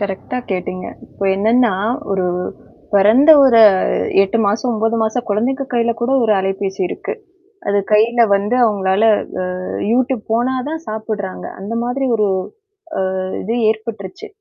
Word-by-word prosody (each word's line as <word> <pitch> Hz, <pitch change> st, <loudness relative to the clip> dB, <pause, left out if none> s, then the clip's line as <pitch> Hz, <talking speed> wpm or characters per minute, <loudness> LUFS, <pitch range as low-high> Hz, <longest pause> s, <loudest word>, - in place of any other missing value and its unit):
கரெக்டா 200 Hz, +5 st, -4 dB
கேட்டீங்க. 185 Hz, -1 st, -4 dB, 0.2 s
இப்போ 200 Hz, -, -7 dB
என்னன்னா, 225 Hz, +2 st, +2 dB, 0.4 s
ஒரு 190 Hz, -2 st, 0 dB, 0.7 s
பொறந்த 220 Hz, +10 st, +5 dB
ஒரு 235 Hz, -4 st, +5 dB, 0.6 s
8 195 Hz, +4 st, -1 dB
மாசம், 225 Hz, +5 st, 0 dB
9 225 Hz, +1 st, 0 dB
மாசம் 230 Hz, +2 st, -2 dB
குழந்தைங்க 255 Hz, +7 st, -1 dB
கையில 235 Hz, -1 st, +1 dB
கூட 235 Hz, +2 st, -1 dB
ஒரு 220 Hz, -, +3 dB
அலைபேசி 195 Hz, 0 st, -3 dB
இருக்கு. -, -, -5 dB, 0.6 s
அது 200 Hz, -, +1 dB
கையில 230 Hz, +3 st, +3 dB
வந்து 205 Hz, +4 st, -1 dB
அவுங்களால 200 Hz, -1 st, +1 dB, 0.6 s
அ -, -, -6 dB, 0.3 s
Youtube 255 Hz, 0 st, 0 dB
போனா 240 Hz, +3 st, +1 dB
தான் 320 Hz, +1 st, -4 dB
சாப்புட்றாங்க. 215 Hz, -3 st, -5 dB
அந்த 200 Hz, +4 st, -6 dB
மாதிரி 250 Hz, +3 st, -2 dB
ஒரு 210 Hz, -2 st, +1 dB, 0.7 s
அ -, -, +1 dB, 0.4 s
இது 225 Hz, +4 st, -3 dB
ஏற்பட்டுருச்சு. 220 Hz, -, -5 dB
220 Hz, 135 wpm, -17 LUFS, 200-240 Hz, 0.7 s, பொறந்த